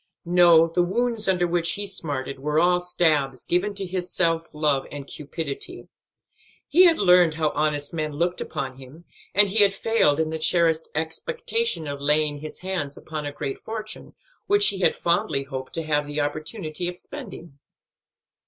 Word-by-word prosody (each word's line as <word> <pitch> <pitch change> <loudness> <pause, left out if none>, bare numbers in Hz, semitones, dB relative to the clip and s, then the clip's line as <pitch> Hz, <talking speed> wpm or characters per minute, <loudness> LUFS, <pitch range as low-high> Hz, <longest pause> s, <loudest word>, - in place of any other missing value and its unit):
No, 170 -2 +6
the 165 +2 0
wounds 225 +4 0
under 180 -2 +2
which 170 -1 0
he 205 - -4
smarted 145 -8 -3
were 150 +3 0
all 180 +1 +3
stabs 155 -7 0
given 195 +4 0
to 195 -1 -3
his 180 -1 -4
self 165 -2 0
love 150 -3 0
and 145 -1 -7
cupidity. 155 - -6 0.8
He 360 +5 +6
had 335 -2 +5
learned 180 -4 +5
how 155 -1 +1
honest 145 0 -1
men 155 -2 -3
looked 175 +4 -1
upon 135 -4 -5
him; 140 +6 -14 0.3
and 205 0 +7
he 215 +3 +2
had 200 -1 +4
failed 195 -9 +2
in 160 0 0
the 160 - -3
cherished 160 0 +2
expectation 450 - -1
of 140 -1 -5
laying 150 0 +1
his 155 +1 -9
hands 175 -7 -4
upon 155 -2 -6
a - - -4
great 135 -1 -5
fortune, 220 -1 -6 0.3
which 410 +1 +5
he 195 - -3
had 185 - +2
fondly 165 -5 0
hoped 130 -1 -7
to 165 - -2
have 150 -1 0
the 145 +1 -3
opportunity 155 +3 -3
of 180 0 -5
spending. 180 - -9
165 Hz, 170 wpm, -24 LUFS, 150-185 Hz, 0.8 s, and